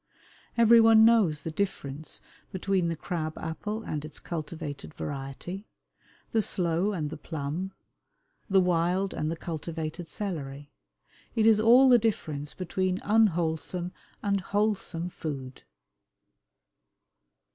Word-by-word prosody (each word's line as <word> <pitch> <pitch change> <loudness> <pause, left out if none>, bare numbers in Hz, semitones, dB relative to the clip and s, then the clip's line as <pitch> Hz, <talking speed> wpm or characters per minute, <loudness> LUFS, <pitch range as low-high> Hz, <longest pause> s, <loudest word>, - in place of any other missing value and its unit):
Every 230 0 +7
one 225 -1 +7
knows 205 -10 +4
the 165 - -3
difference 155 -5 -4 0.3
between 190 -1 0
the 165 - -1
crab 160 -1 -4
apple 210 +7 -4
and 150 -2 -4
its 150 -1 -8
cultivated 155 -3 -6
variety, 145 +8 -6 0.6
the 225 - +3
sloe 180 0 0
and 155 -7 -3
the 155 - -5
plum, 160 +5 -4 0.8
the 195 -1 +5
wild 180 +2 +1
and 155 - -2
the 165 - -2
cultivated 160 0 -5
celery. 145 -7 -5 0.6
It 220 - +3
is 220 -1 +6
all 240 +5 +7
the 245 -2 +7
difference 155 -10 -2
between 185 +1 -1
unwholesome 175 -4 +1 0.3
and 200 -1 +1
wholesome 200 -4 -1
food. 135 -6 -6
175 Hz, 115 wpm, -28 LUFS, 155-200 Hz, 0.8 s, Every